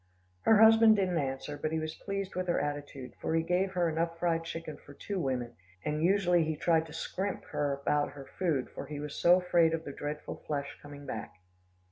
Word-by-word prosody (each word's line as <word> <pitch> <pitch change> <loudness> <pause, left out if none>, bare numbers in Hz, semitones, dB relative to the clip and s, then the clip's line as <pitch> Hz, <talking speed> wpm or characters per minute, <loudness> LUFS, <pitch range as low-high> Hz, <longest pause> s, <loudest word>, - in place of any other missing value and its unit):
Her 225 - +7
husband 225 0 +8
didn't 185 -4 +1
answer, 135 +1 -3
but 155 - -1
he 160 - 0
was 155 0 -3
pleased 195 +1 -4
with 185 0 -2
her 175 - +2
attitude, 145 -3 -4
for 160 - 0
he 165 - +2
gave 185 +3 0
her 175 -2 +2
enough 165 +1 -1
fried 165 -1 0
chicken 165 -2 -6
for 145 - -15
two 200 +5 -4
women, 125 -5 -2 0.3
and 150 0 -1
usually 180 -1 +3
he 160 0 -1
tried 160 +1 +2
to - - -12
scrimp 190 +4 -3
her 145 -1 0
about 145 +1 0
her 140 -2 -9
food, 155 -8 -1
for - - -7
he 150 -1 -5
was 150 0 -5
so 175 +1 +5
afraid 170 -2 +3
of 160 - -6
the 145 - -7
dreadful 150 +1 -5
flesh 140 -2 -3
coming 145 -1 -10
back. 110 - -5
160 Hz, 210 wpm, -31 LUFS, 145-180 Hz, 0.3 s, husband